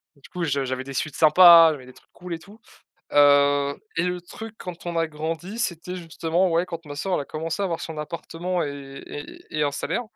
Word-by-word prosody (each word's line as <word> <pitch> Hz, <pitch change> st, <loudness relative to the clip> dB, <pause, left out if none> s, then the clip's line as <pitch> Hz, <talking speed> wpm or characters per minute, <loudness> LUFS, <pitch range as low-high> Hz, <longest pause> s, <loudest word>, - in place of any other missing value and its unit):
Du 140 Hz, -, -18 dB
coup, 180 Hz, -1 st, -4 dB
je 140 Hz, -4 st, 0 dB
j'avais 130 Hz, 0 st, -3 dB
des 135 Hz, +1 st, -8 dB
sweats 145 Hz, +2 st, -3 dB
sympas, 165 Hz, +1 st, +8 dB
j'avais 135 Hz, -4 st, -8 dB
des 130 Hz, -, -13 dB
trucs -, -, -23 dB
cool 175 Hz, -1 st, -6 dB
et -, -, -9 dB
tout. 205 Hz, +6 st, -16 dB, 0.5 s
Heu, 145 Hz, 0 st, +5 dB, 0.2 s
et 165 Hz, -, +1 dB
le 180 Hz, 0 st, -1 dB
truc 220 Hz, +5 st, -10 dB
quand 175 Hz, -1 st, -8 dB
on 170 Hz, -1 st, -2 dB
a 165 Hz, -, +2 dB
grandi, 165 Hz, +7 st, -5 dB
c'était, 180 Hz, -4 st, -3 dB
justement, 170 Hz, +1 st, 0 dB
ouais, 170 Hz, +1 st, +2 dB
quand 170 Hz, -2 st, -7 dB
ma 145 Hz, -1 st, -8 dB
sœur 185 Hz, +6 st, -2 dB
elle -, -, +1 dB
a -, -, -8 dB
commencé 160 Hz, +6 st, -4 dB
à -, -, +1 dB
avoir 170 Hz, -3 st, -2 dB
son 160 Hz, -1 st, -7 dB
appartement 170 Hz, +3 st, -3 dB
et 140 Hz, -1 st, -7 dB
et 145 Hz, -, -8 dB, 0.2 s
et 155 Hz, -, -3 dB
et -, -, +3 dB
un 145 Hz, -, +2 dB
salaire. 140 Hz, -, -2 dB
165 Hz, 235 wpm, -24 LUFS, 145-175 Hz, 0.5 s, sympas